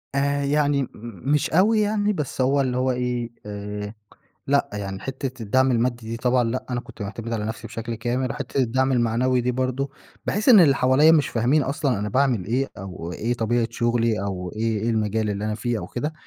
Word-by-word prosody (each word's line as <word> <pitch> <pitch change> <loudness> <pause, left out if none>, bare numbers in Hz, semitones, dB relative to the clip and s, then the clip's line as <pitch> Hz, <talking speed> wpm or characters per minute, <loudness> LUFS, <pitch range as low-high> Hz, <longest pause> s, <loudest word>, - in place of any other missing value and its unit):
آآ 140 +1 +1
يعني 145 0 +2
م - - -5 0.4
مش 150 - +2
أوي 210 +6 +4
يعني 210 0 +1
بس 150 -6 -3
هو 135 +2 +3
اللي 125 -2 -1
هو 130 +1 +2
إيه، 125 -1 -2 0.2
آآ 105 0 -5 0.6
لأ. 140 0 +3
يعني 100 -2 -5
حتّة 130 -2 -5
الدعم 130 +5 +2
المادي 120 -1 0
دي 115 - -3
طبعًا 125 +1 +2
لأ، 115 +3 -2
أنا 125 -1 -1
كنت 115 - -10
مُعتَمِد 115 +3 -5
على 110 -2 -1
نفسي 110 +1 -5
بشكل 115 +1 -5
كامل. 120 +3 -2
وحتة 140 -2 -4
الدعم 130 +2 +1
المعنوي 125 +1 +2
دي 125 +1 0
برضه، 130 +2 -1 0.4
باحس 210 +6 0
إن 220 -6 +9
اللي 145 -6 +6
حواليّا 135 +5 +5
مش 150 -3 +3
فاهمين 125 +6 +2
أصلًا 140 -5 0
أنا 105 - -2
باعمل 130 -5 +1
إيه 130 +6 0
أو 90 -2 -7
إيه 120 +7 -1
طبيعة 115 0 +1
شغلي 115 -2 +1
أو 90 -3 -4
إيه 110 -1 0
إيه 115 - +1
المجال 110 -1 0
اللي 100 +1 -3
أنا 110 0 -1
فيه 115 +2 -2
أو - - -6
كده؟ 150 +6 -3
125 Hz, 205 wpm, -23 LUFS, 110-135 Hz, 0.6 s, إن